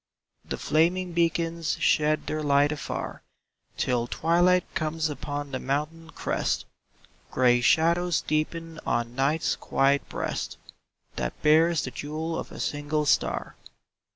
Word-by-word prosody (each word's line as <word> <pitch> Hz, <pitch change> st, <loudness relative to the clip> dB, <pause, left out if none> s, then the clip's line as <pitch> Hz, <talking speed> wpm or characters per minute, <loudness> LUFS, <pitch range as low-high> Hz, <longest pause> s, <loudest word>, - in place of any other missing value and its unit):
The -, -, -5 dB
flaming 175 Hz, +3 st, +1 dB
beacons 165 Hz, -1 st, 0 dB
shed 155 Hz, 0 st, +2 dB
their 155 Hz, -, -2 dB
light 145 Hz, 0 st, +3 dB
afar 150 Hz, -, -5 dB, 0.6 s
Till 120 Hz, -2 st, 0 dB
twilight 175 Hz, +5 st, +3 dB
comes 160 Hz, 0 st, -1 dB
upon 145 Hz, -1 st, -5 dB
the 130 Hz, -, -3 dB
mountain 155 Hz, +4 st, -3 dB
crest; -, -, -2 dB, 0.6 s
Gray 125 Hz, -1 st, +3 dB
shadows 165 Hz, +5 st, +3 dB
deepen 160 Hz, +1 st, -2 dB
on 120 Hz, 0 st, -1 dB
Night's 140 Hz, +5 st, +1 dB
quiet 140 Hz, +1 st, +1 dB
breast, -, -, -3 dB, 0.6 s
That -, -, -3 dB
bears 160 Hz, +2 st, +4 dB
the 130 Hz, -, -4 dB
jewel 155 Hz, +4 st, -4 dB
of -, -, -7 dB
a -, -, -9 dB
single 150 Hz, +1 st, -1 dB
star. -, -, +1 dB
155 Hz, 125 wpm, -26 LUFS, 145-165 Hz, 0.6 s, bears